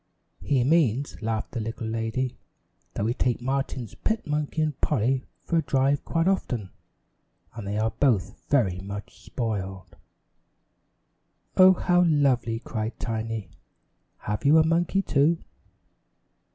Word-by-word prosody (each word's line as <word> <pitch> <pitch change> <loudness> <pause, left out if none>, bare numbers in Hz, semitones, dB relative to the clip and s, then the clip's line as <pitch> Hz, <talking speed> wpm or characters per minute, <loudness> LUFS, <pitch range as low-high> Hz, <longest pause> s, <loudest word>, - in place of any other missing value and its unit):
"He 135 -4 +2
means," 140 -4 +1
laughed 110 -1 -2
the - - -3
little 115 +1 -4
lady, 115 +3 -2 0.6
"that 100 - -1
we 115 - +1
take 125 -1 0
Martin's 130 -2 -2
pet 220 0 -2
monkey 150 +1 -1
and 150 -3 -3
Polly 130 -1 +1 0.2
for 170 - 0
a - - +4
drive 140 -1 +1
quite 165 +1 0
often 125 - -1 0.8
and 105 -3 -7
they 100 +1 -2
are 110 +1 +1
both 120 -9 0
very 100 -11 +2
much 100 +2 -8
spoiled." 95 -6 -4 1.6
"Oh, 185 0 +8
how 180 -1 +2
lovely!" 135 -7 +2
cried 110 0 -4
Tiny. 110 -2 -3 0.7
"Have 105 +4 -3
you 150 +3 +6
a 160 - +5
monkey, 175 +4 +1
too?" 150 +2 +3
125 Hz, 130 wpm, -26 LUFS, 110-150 Hz, 1.6 s, Oh